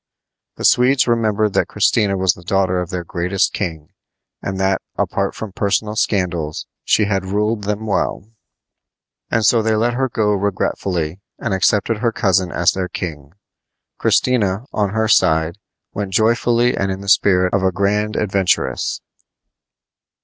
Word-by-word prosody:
The - - -4
Swedes 130 +2 +4
remembered 110 -3 +1
that - - +1
Christina 100 -3 +1
was 95 -2 +2
the 90 - -15
daughter 95 0 +1
of 90 - -5
their 90 -2 -4
greatest 90 +3 -1
king, 80 -6 -4 0.5
and 95 -1 -4
that, 95 0 +1
apart - - -1
from 110 -2 -6
personal 105 +2 -1
scandals, 85 -8 -1 0.2
she 105 - +3
had 95 -2 -1
ruled 105 +2 -1
them 105 +1 -2
well; 100 -1 -1 1.0
and 115 -1 +1
so 115 +2 +4
they 110 0 +1
let 115 +3 +1
her 130 +1 -1
go 105 -3 +1
regretfully 95 -3 -2 0.2
and - - -3
accepted 105 +3 +1
her 115 0 +1
cousin 95 -4 +1
as 85 - +2
their 95 -1 -3
king. 75 -5 -6 0.7
Christina, 110 -4 +1
on 105 -2 0
her 110 +2 0
side, 80 -3 +2 0.3
went 100 -2 -4
joyfully 120 +3 +2
and 95 0 -1
in 95 +1 -5
the 100 - -9
spirit 90 -1 +3
of 100 - +2
a 95 0 +2
grand 105 +3 0
adventuress. 95 -2 0
100 Hz, 150 wpm, -19 LUFS, 90-110 Hz, 1.0 s, Swedes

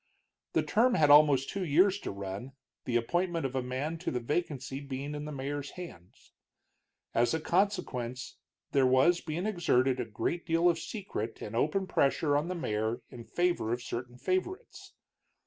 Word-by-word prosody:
The - - +2
term 240 +3 +3
had 150 -2 +5
almost 145 -3 +6
two 195 -1 -2
years 185 +5 +4
to - - -5
run, 100 +6 -6 0.3
the 125 - -2
appointment 170 +6 0
of 135 - -2
a 130 - +1
man 135 +6 -3
to 180 - -2
the 125 - -1
vacancy 135 0 -2
being 140 +1 -5
in 150 0 -5
the 150 - -5
mayor's 145 +1 -4
hands. 95 - -11 0.8
As 120 +6 +2
a - - -1
consequence 155 - -1 0.3
there 135 -2 +4
was 130 +7 +4
being 165 +4 -3
exerted 135 -10 +2
a 125 - -1
great 115 +10 -2
deal 165 0 +2
of 170 -2 +3
secret 165 - -5
and 105 - -6
open 155 +10 +1
pressure 145 -3 +2
on 150 +3 +1
the 185 - -3
mayor 110 -5 -2
in 115 -1 -9
favor 175 -10 0
of 120 +1 -2
certain 125 0 -5
favorites. 185 - -3
145 Hz, 170 wpm, -30 LUFS, 125-175 Hz, 0.8 s, almost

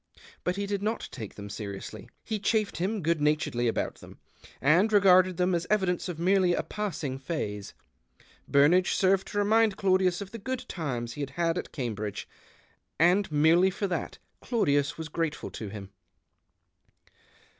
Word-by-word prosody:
But 180 - 0
he 200 0 -2
did 200 -1 -2
not 220 +3 -2
take 110 -3 -8
them 100 0 -8
seriously; 100 -1 -7
he 215 -1 -3
chaffed 210 +1 0
him 195 +2 -2
good 165 -1 +1
naturedly 150 -5 +1
about 115 - -2
them, - - -13 0.4
and 175 +10 +4
regarded 185 -3 +5
them 180 0 +2
as 170 0 -1
evidence 190 -4 +1
of 175 - -5
merely 180 +1 +3
a - - -1
passing 155 -11 -4
phase. 105 - -4 0.7
Burnage 160 +6 +4
served 190 0 +2
to - - -6
remind 215 0 +3
Claudius 185 -2 +2
of 200 -1 -7
the 230 - -7
good 260 +4 -4
times 125 -8 -4
he 145 - -6
had 140 - -3
had 165 +3 0
at 180 - -5
Cambridge, 105 -6 -4 0.7
and 180 +2 +3
merely 160 +5 +4
for 195 +2 -3
that 185 -3 -3 0.2
Claudius 145 - +1
was 160 -1 -5
grateful 160 0 -3
to 110 - -6
him. 100 -1 -9
175 Hz, 160 wpm, -28 LUFS, 140-195 Hz, 0.7 s, regarded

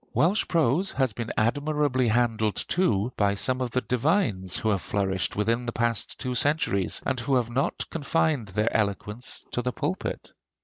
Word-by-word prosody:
Welsh 185 +7 +2
prose 165 +3 +2
has 130 -4 +1
been 115 +1 -5
admirably 145 +2 +1
handled 110 -2 +1
too 120 - +1
by 100 -1 +2
some 130 +5 0
of 125 - -1
the 125 +2 0
divines 125 - +1
who 110 - 0
have 100 -3 +1
flourished 95 -2 -1
within 115 +4 0
the - - -1
past 115 -2 -2
two 125 -2 -3
centuries, 125 - +1
and 130 -1 0
who 130 +3 0
have 120 -2 0
not 135 +4 -1
confined 155 -5 0
their 105 +4 -1
eloquence 105 +3 -2
to 120 - -1
the 125 +1 -1
pulpit. - - -4
120 Hz, 170 wpm, -26 LUFS, 105-140 Hz, -, Welsh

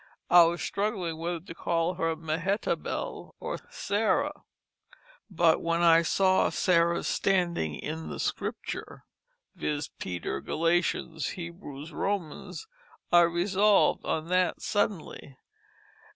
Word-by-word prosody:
I 175 - +9
was 170 +1 -1
struggling 195 -6 -2
whether 170 0 -3
to 175 -1 -10
call 170 +1 0
her 165 -2 -1
Mehetable 165 +6 -3
or - - -4
Sarah. 220 - 0 0.9
But 170 -3 +3
when 170 +1 0
I 165 -1 +7
saw 185 +3 +3
Sarah's 170 -1 +2
standing 175 - +1
in 160 - -5
the - - -6
Scripture, - - -4 0.5
viz: 150 0 -3
Peter, 85 -6 -4
Galatians, 165 -1 0
Hebrews, 170 -4 -8
Romans, 195 - -3 0.5
I 175 - +8
resolv'd 190 +5 +3
on 160 +1 -2
that 185 0 +1
suddenly." 190 -9 -2
170 Hz, 110 wpm, -28 LUFS, 160-185 Hz, 0.9 s, I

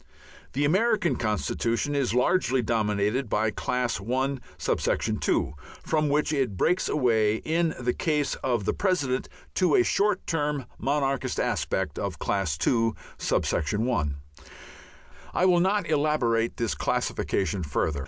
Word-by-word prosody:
The 145 +2 +1
American 205 +3 +2
constitution 115 +4 -1
is 135 -4 0
largely 130 -2 +2
dominated 110 +2 0
by 110 +1 +1
Class 125 +1 -1
I.(2), 130 - -1 0.3
from 155 -2 +1
which 150 +2 +1
it 130 -9 0
breaks 180 - +1
away 110 -7 +2
in 165 +6 0
the 125 0 0
case 150 -3 0
of 120 -6 0
the - - +1
President 145 -10 0 0.2
to 180 -5 +3
a - - +5
short 200 - +1
term 150 -4 -1
monarchist 140 -1 0
aspect - - -1
of - - -3
Class 95 -8 -1
II.(1). 115 - 0 1.2
I 180 - +3
will 180 -2 +5
not 190 0 +1
elaborate 145 -7 +1
this 115 -2 0
classification 100 -1 -1
further. 75 -1 -1
130 Hz, 120 wpm, -26 LUFS, 110-155 Hz, 1.2 s, a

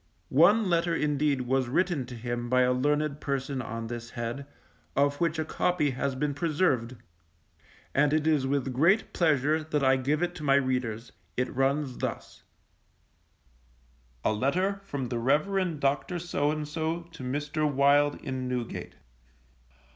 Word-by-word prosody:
One 195 +9 +5
letter 170 -1 +1
indeed 150 -3 +1
was 130 0 0
written 155 -1 0
to 125 - -8
him 120 +1 -4
by 130 +1 +4
a 125 0 +3
learned 145 +2 0
person 135 -1 -2
on 115 -2 -5
this 120 0 -6
head, 120 +5 -5 0.5
of 145 +2 +1
which 165 -1 +1
a 160 - -1
copy 160 -3 +1
has 135 +1 -2
been 145 +2 -1
preserved, 145 -6 0 1.0
and 145 +1 +3
it 155 0 +1
is 150 -4 +2
with 135 -2 -1
great 170 - +3
pleasure 155 -1 +2
that 150 -2 -1
I 130 0 +4
give 145 +5 0
it 175 0 -1
to 150 - -8
my 140 -1 +4
readers, 125 -4 -1 0.3
it 125 - -1
runs 135 0 0
thus: - - -5 1.8
A - - +3
letter 185 - 0
from 140 -9 -4
the 120 - -2
Reverend 160 +6 +1
Dr. 140 +6 0
to - - -4
Mr. 155 -1 -2
Wild 145 +1 +4
in 130 -1 -4
Newgate. 125 -2 -4
140 Hz, 145 wpm, -28 LUFS, 130-155 Hz, 1.8 s, One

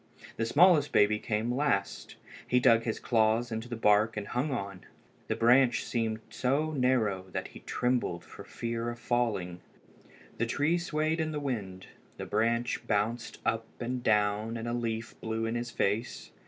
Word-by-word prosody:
The 115 - -1
smallest 155 +1 +5
baby 105 +1 +4
came 110 +3 -1
last. 125 -8 -1 0.3
He 125 - +3
dug 115 -2 +4
his 110 - -2
claws 115 +1 +2
into 110 +2 -4
the 120 - -3
bark 110 0 +3
and 105 -1 -4
hung 125 +5 -1
on. 100 -8 -4 0.4
The - - -1
branch 120 +2 +4
seemed 110 -2 -2
so 140 +5 0
narrow 120 -9 +1
that - - -3
he - - -12
trembled 125 -8 -1
from - - -11
fear 115 0 -3
of 120 - -6
falling. 115 -8 -1 0.8
The 115 - +1
tree 150 +8 +1
swayed 160 -1 -1
in 160 0 -1
the 150 - -3
wind. 100 -10 -4 0.3
The - - -5
branch 115 +3 0
bounced 110 +3 -1
up 115 0 0
and 125 +1 -3
down, 105 0 +1
and 115 +1 -5
a 120 - -2
leaf 115 -2 -3
blew 110 0 -2
in 115 - -2
his 120 0 -3
face. 105 +1 -2
115 Hz, 170 wpm, -30 LUFS, 110-125 Hz, 0.8 s, smallest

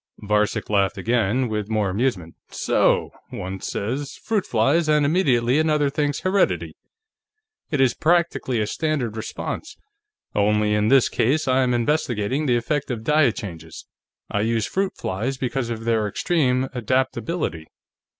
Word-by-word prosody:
Varcek 105 0 0
laughed 100 0 +1
again, 115 +4 +1
with 105 -2 -3
more 105 -3 0
amusement. 95 -6 -1 0.2
"So! - - +1 0.2
One 95 +1 -6
says: 135 +7 -3
'Fruit 215 -4 -2
flies,' 140 +9 +2
and 150 -1 +4
immediately 140 -5 +2
another 150 -3 +2
thinks: 145 -1 -1
'Heredity.' 90 - +1 0.9
It 145 - -1
is 130 -2 +4
practically 165 -7 +1
a 105 - +1
standard 135 -3 -2
response. 110 - -5 0.6
Only, 105 +1 +2
in 105 0 +2
this 135 +1 +5
case, 145 +6 +1
I 130 0 +3
am 125 -1 +2
investigating 130 0 0
the 120 -2 +3
effect 140 +5 -2
of 115 -3 -4
diet 150 -3 +3
changes. 85 -8 -8 0.4
I 105 - -1
use 115 0 0
fruit 195 0 -1
flies 115 +9 -3
because 130 -1 -2
of 115 -1 -4
their 115 -2 +1
extreme 130 - +1
adaptability. 125 - -1
120 Hz, 140 wpm, -23 LUFS, 105-145 Hz, 0.9 s, this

